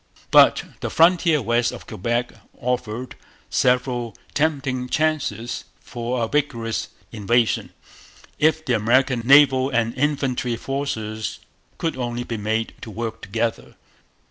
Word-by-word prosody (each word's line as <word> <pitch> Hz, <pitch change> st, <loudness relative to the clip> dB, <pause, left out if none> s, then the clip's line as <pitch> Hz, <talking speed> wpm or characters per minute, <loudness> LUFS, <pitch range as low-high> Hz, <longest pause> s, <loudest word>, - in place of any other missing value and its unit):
But -, -, +6 dB, 0.2 s
the -, -, -3 dB
frontier 165 Hz, -3 st, +4 dB
west 120 Hz, +1 st, +1 dB
of -, -, -10 dB
Quebec 120 Hz, +5 st, -2 dB, 0.3 s
offered 125 Hz, 0 st, -3 dB, 0.4 s
several 125 Hz, -3 st, +1 dB, 0.2 s
tempting 135 Hz, -4 st, 0 dB
chances 135 Hz, -8 st, -1 dB
for 120 Hz, 0 st, -3 dB
a -, -, 0 dB
vigorous 115 Hz, -5 st, -1 dB, 0.2 s
invasion, 115 Hz, +1 st, +1 dB, 0.7 s
if 160 Hz, +1 st, +2 dB
the 125 Hz, -, +1 dB
American 125 Hz, +3 st, +2 dB
naval 135 Hz, 0 st, +6 dB
and 120 Hz, -3 st, 0 dB
military 130 Hz, -4 st, 0 dB
forces 110 Hz, -6 st, -3 dB, 0.4 s
could 165 Hz, -, -2 dB
only 120 Hz, -1 st, -3 dB
be 115 Hz, -2 st, -4 dB
made 110 Hz, +2 st, -1 dB
to -, -, -8 dB
work 110 Hz, +1 st, -5 dB
together. 115 Hz, +3 st, -3 dB
120 Hz, 115 wpm, -22 LUFS, 115-135 Hz, 0.7 s, But